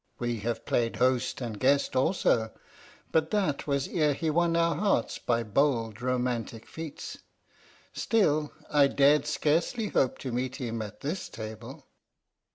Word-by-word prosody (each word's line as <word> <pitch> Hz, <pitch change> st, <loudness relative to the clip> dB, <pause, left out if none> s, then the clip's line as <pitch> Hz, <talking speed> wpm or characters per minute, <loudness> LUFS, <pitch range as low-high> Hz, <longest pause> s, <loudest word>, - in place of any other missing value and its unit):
"We 120 Hz, -2 st, -2 dB
have 115 Hz, +3 st, -3 dB
played 115 Hz, -1 st, 0 dB
host 125 Hz, 0 st, +1 dB
and 115 Hz, -4 st, -4 dB
guest 140 Hz, +1 st, +2 dB
also: 125 Hz, -, +2 dB, 0.6 s
but 160 Hz, 0 st, +2 dB
that 190 Hz, -11 st, 0 dB
was 140 Hz, -1 st, 0 dB
ere 150 Hz, -4 st, +1 dB
he 160 Hz, +2 st, -1 dB
won 170 Hz, +1 st, +2 dB
our 170 Hz, 0 st, +3 dB
hearts 170 Hz, -, 0 dB
by 115 Hz, -1 st, 0 dB
bold, 115 Hz, -1 st, 0 dB
romantic 125 Hz, -3 st, -2 dB
feats. 160 Hz, -2 st, -7 dB, 0.7 s
Still, 155 Hz, -9 st, +1 dB, 0.2 s
I 145 Hz, -2 st, +5 dB
dared 145 Hz, +1 st, +4 dB
scarcely 160 Hz, -, 0 dB
hope 130 Hz, -, +1 dB
to 130 Hz, -, -5 dB
meet 125 Hz, +1 st, -2 dB
him 115 Hz, -5 st, -4 dB
at 105 Hz, -2 st, -8 dB
this 165 Hz, +7 st, -3 dB
table." 110 Hz, -1 st, -8 dB
135 Hz, 145 wpm, -28 LUFS, 120-155 Hz, 0.7 s, I